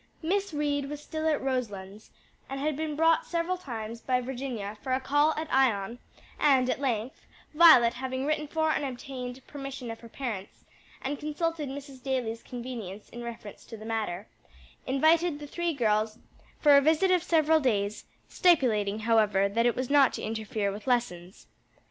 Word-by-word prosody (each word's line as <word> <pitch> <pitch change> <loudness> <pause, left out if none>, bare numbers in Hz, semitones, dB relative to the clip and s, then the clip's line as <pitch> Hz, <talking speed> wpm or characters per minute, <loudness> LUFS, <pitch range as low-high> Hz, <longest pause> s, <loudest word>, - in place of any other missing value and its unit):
Miss 395 +4 0
Reed 290 -2 -1
was 295 0 -5
still 315 +1 -4
at 305 -3 +1
Roselands, 215 -6 -4 0.4
and 270 0 -4
had 300 +1 -1
been 310 0 -3
brought 325 +1 +3
several 340 +2 -1
times 230 -9 -7
by 255 -1 +1
Virginia 245 -5 -5
for 260 - -2
a 260 - +2
call 290 +3 +3
at 315 +1 -3
Ion, 235 -4 +2 0.4
and 260 -3 +4
at - - -2
length, 245 -3 -3 0.3
Violet 300 -8 +7
having 260 +1 -3
written 305 0 -1
for 315 +1 +1
and - - 0
obtained 255 -1 -6
permission 275 -4 -7
of 225 - -8
her 230 - -13
parents, 220 -7 -6 0.4
and 280 +2 -3
consulted 305 0 -2
Mrs. 275 -1 -9
Daly's 245 -4 -2
convenience 235 -5 -7
in 240 - -9
reference 230 -3 -8
to 225 - -9
the 215 - -10
matter, 215 -4 -3 0.6
invited 315 +4 +3
the 295 - -8
three 345 +3 -2
girls 215 -5 0 0.4
for 295 -2 +6
a 280 - +7
visit 320 +6 +3
of 365 -1 +4
several 320 -2 +3
days, 210 -6 -1 0.2
stipulating, 220 - +2
however, 215 -3 +3
that 230 +4 +2
it 240 - +1
was 255 +1 -3
not 280 -3 +5
to - - -5
interfere 215 -2 -2
with 210 +5 -9
lessons. 190 -8 -1
260 Hz, 170 wpm, -28 LUFS, 225-295 Hz, 0.6 s, Violet